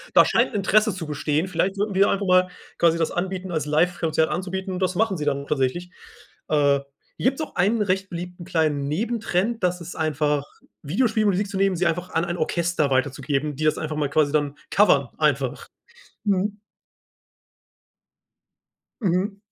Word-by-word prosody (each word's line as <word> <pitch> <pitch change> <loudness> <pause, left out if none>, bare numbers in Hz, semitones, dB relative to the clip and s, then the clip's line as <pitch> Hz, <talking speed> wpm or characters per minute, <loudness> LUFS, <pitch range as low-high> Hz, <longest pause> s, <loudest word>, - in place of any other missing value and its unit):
Da - - +8
scheint - - +1
Interesse 210 +2 +3
zu 175 -2 -6
bestehen. 150 +3 -1
Vielleicht 190 +1 -1
würden 205 0 -1
wir 195 +1 +4
einfach 200 0 0
mal 185 0 +4 0.3
quasi 170 -1 +4
das 165 -1 0
anbieten 185 +1 -3
als 160 -3 -1
Live 175 +4 +1
Konzert 160 -1 +1
anzubieten" 190 +1 -3
und 180 - -3
das 185 0 0
machen 205 -1 +1
sie 150 - -3
dann 140 -1 -1
tatsächlich. 150 +6 -1 0.6
Äh, 145 -2 +3 0.4
hier - - -4
gibt's 275 - -7
auch 310 - -6
einen 210 +5 +2
recht 190 -1 0
beliebten 175 0 -7
kleinen 155 -5 0
Nebentrend, 225 +4 -1
das 180 0 0
ist 170 +1 -8
einfach 150 -2 0 0.4
Videospiele 215 - +1
und 205 - +4
Musik 195 +2 -1
zu 195 - -4
nehmen, 195 -1 +2
sie 175 +1 +1
einfach 175 +2 -2
an 165 +1 0
ein 175 0 -3
Orchester 170 -2 0
weiterzugeben, 140 +2 0
die 155 - -4
das 155 - +2
einfach 155 -1 -4
mal 150 -2 -1
quasi 145 0 +2
dann 145 -1 0
covern 140 -11 +4
einfach. 140 -3 0 0.6
Mhm. 205 +1 0 2.4
Mhm. 195 +1 0
175 Hz, 170 wpm, -23 LUFS, 150-195 Hz, 2.4 s, Da